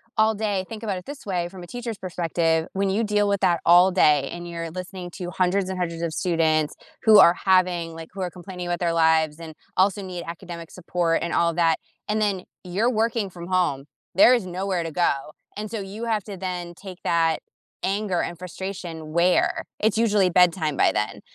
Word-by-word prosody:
all 220 Hz, 0 st, +3 dB
day 205 Hz, -3 st, -1 dB
Think 225 Hz, -1 st, -7 dB
about 200 Hz, -4 st, -2 dB
it -, -, -16 dB
this 285 Hz, 0 st, -9 dB
way, 175 Hz, -3 st, -1 dB
from 185 Hz, -1 st, -10 dB
a -, -, -10 dB
teacher's 235 Hz, -1 st, -5 dB
perspective, 165 Hz, -3 st, 0 dB
when 195 Hz, 0 st, 0 dB
you 215 Hz, +4 st, +1 dB
deal 210 Hz, -1 st, +2 dB
with 200 Hz, -1 st, 0 dB
that 175 Hz, -3 st, +3 dB
all 175 Hz, +2 st, +7 dB
day 150 Hz, -6 st, +4 dB
and 175 Hz, 0 st, -7 dB
you're 170 Hz, -1 st, -5 dB
listening 180 Hz, 0 st, -7 dB
to 180 Hz, -2 st, -5 dB
hundreds 185 Hz, +1 st, +1 dB
and 190 Hz, -, -3 dB
hundreds 170 Hz, -2 st, -3 dB
of 165 Hz, -2 st, -2 dB
students 160 Hz, -4 st, +1 dB, 0.3 s
who 220 Hz, -2 st, +8 dB
are 170 Hz, -, +8 dB
having, 180 Hz, -3 st, +1 dB
like 165 Hz, 0 st, -9 dB
who 195 Hz, -, -6 dB
are 180 Hz, -, -1 dB
complaining 180 Hz, 0 st, -8 dB
about 175 Hz, -1 st, -1 dB
their 170 Hz, -2 st, 0 dB
lives 160 Hz, -2 st, +3 dB
and 160 Hz, -1 st, -8 dB, 0.2 s
also 195 Hz, +1 st, +2 dB
need 180 Hz, -2 st, -6 dB
academic 170 Hz, -1 st, -8 dB
support 175 Hz, -2 st, 0 dB
and 170 Hz, -, -2 dB
all 170 Hz, -, +3 dB
of 165 Hz, -, -4 dB
that, 165 Hz, -2 st, +3 dB, 0.3 s
and 215 Hz, +1 st, 0 dB
then 195 Hz, -3 st, 0 dB, 0.2 s
you're 200 Hz, +7 st, 0 dB
working 225 Hz, -3 st, 0 dB
from 175 Hz, -1 st, -9 dB
home, 175 Hz, -7 st, 0 dB, 0.3 s
there 235 Hz, +7 st, +7 dB
is 220 Hz, -6 st, -2 dB
nowhere 185 Hz, 0 st, -2 dB
to 165 Hz, -, -5 dB
go, 175 Hz, +2 st, +2 dB, 0.5 s
and 215 Hz, +1 st, -5 dB
so 225 Hz, -, -3 dB
you 200 Hz, +4 st, -6 dB
have 220 Hz, -4 st, 0 dB
to 200 Hz, -3 st, -7 dB
then 180 Hz, -2 st, -4 dB
take 185 Hz, 0 st, -10 dB
that 165 Hz, -1 st, +2 dB, 0.4 s
anger 195 Hz, -2 st, 0 dB
and 170 Hz, -, -4 dB
frustration 175 Hz, -3 st, -7 dB
where? 175 Hz, +1 st, +2 dB, 0.2 s
It's 220 Hz, 0 st, +1 dB
usually 210 Hz, -5 st, +3 dB
bedtime 170 Hz, -4 st, +3 dB
by -, -, +4 dB
then. 105 Hz, -1 st, -2 dB
180 Hz, 210 wpm, -24 LUFS, 170-200 Hz, 0.5 s, who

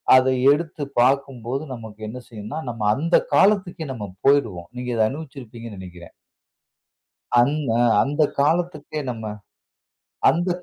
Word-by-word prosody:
அத 130 Hz, 0 st, +6 dB, 0.3 s
எடுத்து 155 Hz, 0 st, -1 dB, 0.2 s
பார்க்கும்போது 135 Hz, 0 st, 0 dB
நமக்கு 110 Hz, -3 st, -10 dB
என்ன 125 Hz, +3 st, -7 dB
செய்யும்ன்னா, 110 Hz, +7 st, -6 dB
நம்ம 115 Hz, -2 st, -6 dB
அந்த 165 Hz, +5 st, +1 dB, 0.2 s
காலத்துக்கே 190 Hz, -5 st, +2 dB
நம்ம 105 Hz, -5 st, -6 dB, 0.2 s
போயிருவோம். 115 Hz, -12 st, +2 dB
நீங்க 125 Hz, 0 st, -4 dB
அத 110 Hz, -, +4 dB
அனுபவிச்சிருப்பீங்கன்னு 120 Hz, -7 st, -9 dB
நினைக்கிறேன். 90 Hz, -2 st, -11 dB, 1.3 s
அந் 130 Hz, +5 st, +3 dB, 0.2 s
அ -, -, +4 dB, 0.2 s
அந்த 145 Hz, +3 st, -1 dB, 0.2 s
காலத்துக்கே 155 Hz, 0 st, 0 dB
நம்ம 110 Hz, -3 st, -5 dB, 1.0 s
அந்த 175 Hz, +3 st, -1 dB
130 Hz, 120 wpm, -23 LUFS, 110-150 Hz, 1.3 s, அத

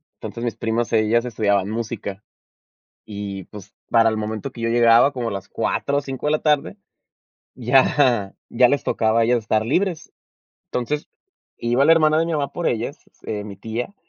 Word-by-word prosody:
Entonces 115 Hz, -, -7 dB
mis 120 Hz, -, -2 dB
primas, 115 Hz, +1 st, -2 dB
ellas 115 Hz, +2 st, +2 dB
estudiaban 100 Hz, -4 st, 0 dB
música. 110 Hz, -3 st, -5 dB, 0.8 s
Y, 100 Hz, -2 st, -6 dB
pues, 105 Hz, +1 st, -12 dB, 0.2 s
para 115 Hz, -1 st, +4 dB
el 110 Hz, -, -1 dB
momento 110 Hz, +3 st, -4 dB
que 120 Hz, -, -11 dB
yo 115 Hz, -, 0 dB
llegaba, 120 Hz, +3 st, +5 dB
como 120 Hz, -3 st, -3 dB
a -, -, -3 dB
las 100 Hz, 0 st, -6 dB
4 140 Hz, 0 st, -1 dB
o -, -, +1 dB
5 135 Hz, -1 st, -6 dB
de 150 Hz, -, +2 dB
la 155 Hz, -, 0 dB
tarde, 145 Hz, -, +1 dB, 0.8 s
ya 125 Hz, -3 st, +2 dB
ya 125 Hz, +1 st, +4 dB
les 145 Hz, -, 0 dB
tocaba 110 Hz, 0 st, +1 dB
a -, -, +4 dB
ellas 120 Hz, +1 st, +2 dB
estar 110 Hz, 0 st, 0 dB
libres. 170 Hz, -, -1 dB, 0.6 s
Entonces, 145 Hz, +5 st, -3 dB, 0.5 s
iba 120 Hz, +3 st, +2 dB
la 160 Hz, -, +7 dB
hermana 155 Hz, -1 st, +4 dB
de 165 Hz, -, +2 dB
mi 170 Hz, -, -2 dB
mamá 145 Hz, -3 st, -1 dB
por 175 Hz, -, -3 dB
ellas, 120 Hz, +6 st, -3 dB, 0.3 s
eh, 105 Hz, -1 st, -3 dB
mi 100 Hz, -2 st, -9 dB
tía, 115 Hz, -, -5 dB
115 Hz, 185 wpm, -22 LUFS, 110-140 Hz, 0.8 s, la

